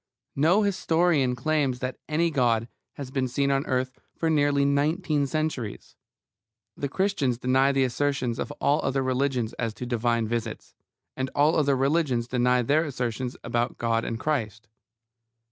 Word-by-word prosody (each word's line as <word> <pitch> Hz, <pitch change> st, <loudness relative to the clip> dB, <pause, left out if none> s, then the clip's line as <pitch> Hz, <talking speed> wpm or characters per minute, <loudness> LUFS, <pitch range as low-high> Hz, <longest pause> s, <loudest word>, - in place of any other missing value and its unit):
No 170 Hz, +9 st, +3 dB
historian 165 Hz, -8 st, +2 dB
claims 140 Hz, -1 st, 0 dB
that 130 Hz, +1 st, -5 dB
any 165 Hz, +2 st, +1 dB
God 120 Hz, -5 st, +1 dB, 0.3 s
has 135 Hz, -2 st, -8 dB
been 135 Hz, -1 st, 0 dB
seen 140 Hz, +3 st, 0 dB
on 135 Hz, +1 st, 0 dB
earth 130 Hz, 0 st, -1 dB, 0.2 s
for 165 Hz, -1 st, 0 dB
nearly 145 Hz, -2 st, +3 dB
nineteen 145 Hz, +1 st, +1 dB
centuries. 135 Hz, -7 st, -3 dB, 0.8 s
The 140 Hz, -, -3 dB
Christians 145 Hz, -9 st, 0 dB
deny 130 Hz, +2 st, +3 dB
the 135 Hz, -1 st, +2 dB
assertions 130 Hz, -2 st, -1 dB
of -, -, -3 dB
all 145 Hz, 0 st, +1 dB
other 135 Hz, 0 st, 0 dB
religions 130 Hz, -3 st, 0 dB
as 115 Hz, -3 st, -2 dB
to 125 Hz, -, -6 dB
divine 120 Hz, -1 st, 0 dB
visits; 115 Hz, -1 st, -4 dB, 0.4 s
and 130 Hz, 0 st, -2 dB
all 145 Hz, +2 st, +4 dB
the 160 Hz, -, +1 dB
other 140 Hz, -2 st, +2 dB
religions 135 Hz, -4 st, +1 dB
deny 125 Hz, 0 st, +2 dB
their 150 Hz, +7 st, +2 dB
assertions 125 Hz, -4 st, -3 dB
about 120 Hz, +1 st, -1 dB
God 115 Hz, -1 st, 0 dB
and 115 Hz, -, -4 dB
Christ. 115 Hz, -6 st, -2 dB
135 Hz, 155 wpm, -26 LUFS, 120-145 Hz, 0.8 s, all